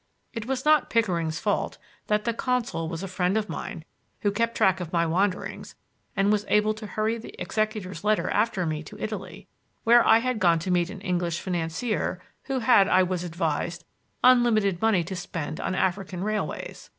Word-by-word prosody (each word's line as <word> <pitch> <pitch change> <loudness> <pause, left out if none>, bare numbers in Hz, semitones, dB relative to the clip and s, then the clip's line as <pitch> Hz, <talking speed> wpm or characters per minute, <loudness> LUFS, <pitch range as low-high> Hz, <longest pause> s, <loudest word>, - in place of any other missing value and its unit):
It 225 -2 -5
was 265 0 -2
not 305 -1 +4
Pickering's 170 -8 +1
fault 205 +2 -1 0.3
that 210 0 +1
the 235 - +1
consul 235 -9 -1
was 165 +2 -5
a - - -3
friend 185 +2 0
of 215 -1 -1
mine - - -6 0.4
who 205 - +2
kept 230 +3 -1
track 190 -1 +3
of 175 -2 -5
my 170 -1 +2
wanderings 185 +3 -1 0.4
and 195 +1 +3
was 210 -1 +2
able 210 +1 +3
to 215 0 -8
hurry 220 +2 -1
the 225 - -11
executor's 215 -4 -2
letter 215 0 +2
after 210 -4 +1
me 155 -1 -2
to 155 - -11
Italy, 215 -3 -6 0.4
where 235 +1 +6
I - - +6
had 250 0 -1
gone 170 -4 +4
to 170 +3 -3
meet 175 -1 +2
an 200 -1 -8
English 175 -3 -1
financier 180 +3 -2 0.3
who 265 -2 -2
had, 220 -5 +5
I 185 - +5
was 180 -1 -2
advised, 170 0 -2 0.4
unlimited 225 -7 +4
money 220 -6 +3
to 185 +3 -6
spend 170 -4 -5
on 185 - -2
African 185 -1 -1
railways. 215 0 -4
195 Hz, 185 wpm, -26 LUFS, 175-220 Hz, 0.4 s, where